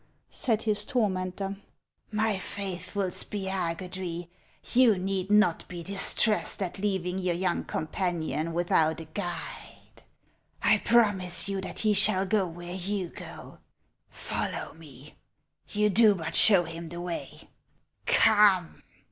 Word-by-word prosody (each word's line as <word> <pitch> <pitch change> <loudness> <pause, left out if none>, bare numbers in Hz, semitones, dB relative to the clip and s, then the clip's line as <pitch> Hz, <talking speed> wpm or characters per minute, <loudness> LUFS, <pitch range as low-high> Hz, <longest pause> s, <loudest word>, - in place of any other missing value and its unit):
" - - -43
said 225 -3 -1
his 210 -2 +2
tormentor; 195 -3 -2 0.3
" - - -44
my 215 0 0
faithful 190 0 -4
Spiagudry, 180 -2 -4 0.4
you 240 -5 +5
need 190 +1 -3
not 210 -5 +3
be 175 -2 -7
distressed 200 +3 +2
at 185 +1 -5
leaving 190 -2 -2
your 180 -2 -1
young 180 0 -1
com - - -4
panion 165 -2 -2
without 165 -2 +1
a 165 - -8
guide. 175 0 -8 0.6
1 - - +4
promise 205 -6 +3
you 195 -1 -2
that 190 - -7
he 215 -1 +2
shall 190 -1 +4
go 195 -1 +1
where 175 +1 -8
you 190 0 -2
go. - - -11 0.5
Follow - - -4
me; 150 -3 -14 0.5
you 210 0 +1
do 210 0 +5
but 165 -3 -5
show 195 -5 +7
him 165 0 -8
the 170 +1 -7
way. 175 -1 -7 0.6
Come 205 -5 +4
185 Hz, 130 wpm, -27 LUFS, 175-205 Hz, 0.6 s, show